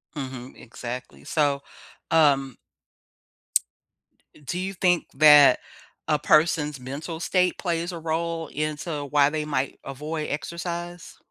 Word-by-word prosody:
Mhm, 130 -3 -7
exactly. 125 +1 -8
So, 145 -3 +1 0.5
um 140 -5 +3 1.8
d - - -19
do 175 +6 -4
you 190 +1 -3
think 180 -1 +1
that 150 0 +7 0.5
a 150 -1 +3
person's 150 -2 +3
mental 145 +6 -6
state 180 +1 +1
plays 170 0 -2
a 170 - -6
role 165 0 -2
into 150 0 -3
why 145 0 +3
they 155 0 -3
might 140 -2 -2
avoid 150 +3 -4
exercise? 170 +3 -5
150 Hz, 115 wpm, -25 LUFS, 140-170 Hz, 1.8 s, that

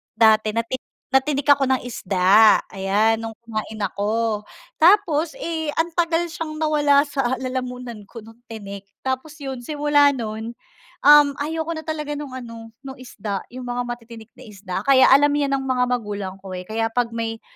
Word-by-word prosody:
dati 220 -1 +4
natik 230 +3 -2 0.3
natinik 275 +1 +1
ako 280 -1 +5
ng 260 - -1
isda, 195 +1 +4
ayan, 205 +3 +1
nung 225 0 -6
kumain 215 -1 -6
ako, 210 +1 -1 0.3
tapos 335 -3 +3
eh, 320 -6 -3
ang 330 +1 0
tagal 335 -1 +2
siyang 320 -1 -6
nawala 295 -2 +4
sa 275 -4 -1
lalamunan 250 -4 -5
ko 230 +3 -11
nung 225 +1 -15
tinik 200 -3 -9 0.2
tapos 260 +3 -3
yun 270 -2 -5
simula 290 -1 +3
nun, 225 -2 -5 0.5
um, 295 -1 +7
ayoko 320 +2 -3
na 315 - -6
talaga 300 -1 -4
nung 285 -3 -6
ano, 230 -2 -9 0.2
nung 265 - -6
isda, 215 -6 -6
yung 250 +1 -8
mga 245 0 -3
matitinik 230 -2 -9
na 255 - -13
isda 200 -3 -8
kaya 270 -1 +6
alam 285 +2 +5
yan 290 -1 0
ng 270 - -5
mga 255 -1 +1
magulang 205 -5 -3
ko 190 -1 -10
eh, 180 - -5
kaya 225 +4 -3
pag 245 -1 0
may, 225 -1 -4
245 Hz, 170 wpm, -22 LUFS, 220-290 Hz, 0.5 s, um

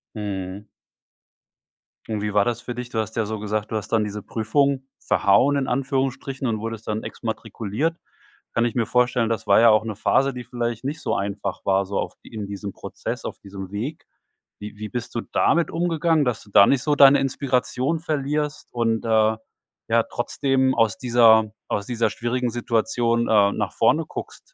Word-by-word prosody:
Mhm. 100 -1 -5 1.4
Und 110 -2 -3
wie 105 0 -2
war 100 -1 +4
das 120 0 -1
für 120 - -6
dich? 125 0 -6
Du 115 - -2
hast 110 0 -3
ja 110 - 0
so 110 0 -4
gesagt: 105 0 -3
„Du - - -2
hast 105 -1 -3
dann 110 -2 +2
diese 105 0 -5
Prüfung 135 +6 0 0.2
‚verhauen‘ 125 +9 +3
in 135 -1 -1
Anführungsstrichen 135 0 -1
und 110 -2 -1
wurdest 115 0 -6
dann 110 0 -2
exmatrikuliert“. 115 +6 -3 0.6
Kann 115 - +2
ich 120 - -2
mir 115 -3 +1
vorstellen, 125 -2 +2
das 115 -3 -3
war 100 - +6
ja 115 0 +7
auch 110 0 +4
'ne 110 - -4
Phase, 135 +6 +2
die 125 -1 -6
vielleicht 120 -1 -3
nicht 150 +4 -4
so - - -1
einfach 100 0 -3
war, 95 0 +2
so 100 +1 -2
auch - - -4
in 110 -2 -7
diesem 100 0 -6
Prozess, - - -6
auf - - -6
diesem 95 -1 -9
Weg. 120 +10 -5 0.5
Wie 105 0 -8
wie 105 0 -6
bist 120 +2 -5
du 115 - 0
damit 170 +7 +1
umgegangen, 165 -2 +1
dass 120 -3 -1
du 105 - -19
da 100 - +7
nicht 135 -3 +2
so 150 -1 +2
deine 140 0 +7
Inspiration 135 +2 0
verlierst 150 -2 -2
und, 115 -2 0
äh, 110 -1 +3 0.5
ja - - +4
trotzdem 130 -2 +1
aus 115 -5 +2
dieser 115 -3 +5 0.2
aus 100 - -2
dieser 115 -2 0
schwierigen 120 +3 -2
Situation, 115 0 0
äh, 100 -2 +4
nach - - -3
vorne - - +3
guckst? - - -7
115 Hz, 185 wpm, -23 LUFS, 105-130 Hz, 1.4 s, ja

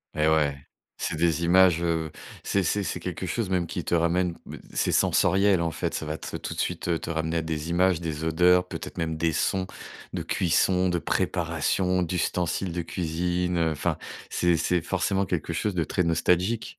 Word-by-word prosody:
Et 75 0 +2
ouais, 75 -3 +2 0.4
c'est - - -2
des 85 0 +1
images, 90 -1 +5
heu, 80 -2 -1 0.3
c'est 100 - +1
c'est 100 +4 0
c'est - - -3
quelque 90 +1 -5
chose 105 -1 -2
même 90 -2 +1
qui - - -4
te - - -3
ramène 85 +1 +2
ben, - - -8
c'est - - +1
sensoriel, 95 -1 +3
en 85 - 0
fait, 80 - -3
ça 80 - -3
va 75 +1 -3
te - - -7
tout - - -5
de - - -7
suite 85 -2 -1
te - - -6
ramener 80 +1 -1
à - - +1
des 80 0 -3
images, 90 0 +2
des 80 -2 -4
odeurs, 90 +3 +4
peut-être - - -7
même 80 -1 -2
des 80 0 +1
sons 95 +3 0 0.5
de - - -3
cuisson, 90 +1 +2
de 85 - 0
préparation, 90 +2 0
d'ustensiles 90 +1 -1
de 85 0 -2
cuisine. 90 +1 -1
Enfin, 80 0 0 0.3
c'est 85 -1 +2
c'est 90 +1 +1
forcément 95 +2 0
quelque 85 -2 -2
chose 95 +4 -1
de 85 - +1
très 90 - 0
nostalgique. 90 +6 +1
85 Hz, 190 wpm, -26 LUFS, 80-90 Hz, 0.5 s, images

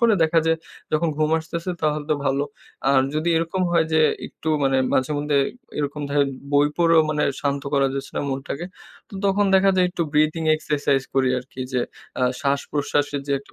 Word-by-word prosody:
পরে 230 -2 +5
দেখা 160 +1 +3
যায় 165 0 +3 0.4
যখন 160 +2 +2
ঘুম 155 0 +1
আসতেছে 170 +2 -5
তাহলে 150 -1 0
তো - - +4
ভালো 135 +1 +1 0.5
আর 135 - +5
যদি 155 +3 0
এরকম 165 +3 -1
হয় 165 -1 +4
যে 160 - +4 0.3
একটু 160 - -7 0.2
মানে 135 0 +2 0.2
মাঝে 130 +2 +1
মধ্যে 145 0 0 0.4
এরকম 145 0 -2
ধরেন 140 -1 +2 0.2
বই 145 0 +5
পড়েও 165 -1 +5
মানে 150 -1 0 0.2
শান্ত 140 -1 -1
করা 135 -1 +3
যাচ্ছে 135 0 -5
না - - +1
মনটাকে 135 +5 -4 0.4
তো - - -13
তখন 200 +1 +2
দেখা 195 +1 +5
যায় 180 -1 +4
একটু 175 - -2
ব্রিদিং 155 +2 +2
এক্সারসাইজ 145 -3 0
করি 130 -1 +3
আরকি 125 +1 -10
যে 125 - +1 0.4
আ - - +1 0.2
শ্বাসপ্রশ্বাসের 145 +1 -1
যে 140 - -1
একটা 140 - -19
150 Hz, 185 wpm, -23 LUFS, 140-165 Hz, 0.5 s, পরে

